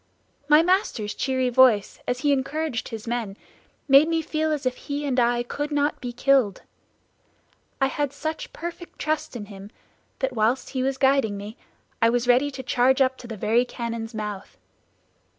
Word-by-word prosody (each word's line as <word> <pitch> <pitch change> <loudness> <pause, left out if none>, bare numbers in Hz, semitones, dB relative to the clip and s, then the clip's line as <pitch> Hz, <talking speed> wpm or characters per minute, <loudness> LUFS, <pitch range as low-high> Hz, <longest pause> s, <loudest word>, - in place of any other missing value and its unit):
My 300 +2 +7
master's 340 - 0
cheery 260 0 0
voice, 245 -5 +4
as 245 +1 -1
he 290 - +2
encouraged 280 -1 -2
his 225 0 -7
men, 230 -4 -3 0.5
made 275 +2 +7
me 325 -1 0
feel 315 0 -1
as 295 -3 -2
if 255 0 0
he 290 +1 -4
and 260 -3 +1
I 240 0 +2
could 290 +4 -4
not 290 0 0
be 245 - -4
killed. 245 -4 +2 1.2
I 270 - +3
had 285 0 -1
such 315 +2 -5
perfect 345 +1 -8
trust 305 -3 -2
in 215 -3 -5
him 200 -1 -11 0.5
that 265 -1 -2
while 225 +1 +3
he 265 0 -5
was 265 +1 -1
guiding 265 -6 +2
me 205 +2 -8 0.5
I 230 - +5
was 245 +1 0
ready 250 +4 +4
to 270 -2 -7
charge 255 +2 +2
up 260 -1 +3
to 240 - -10
the 225 -2 -7
very 225 +5 +2
cannon's 230 -2 -5
mouth. 210 -2 -6
255 Hz, 175 wpm, -24 LUFS, 230-285 Hz, 1.2 s, My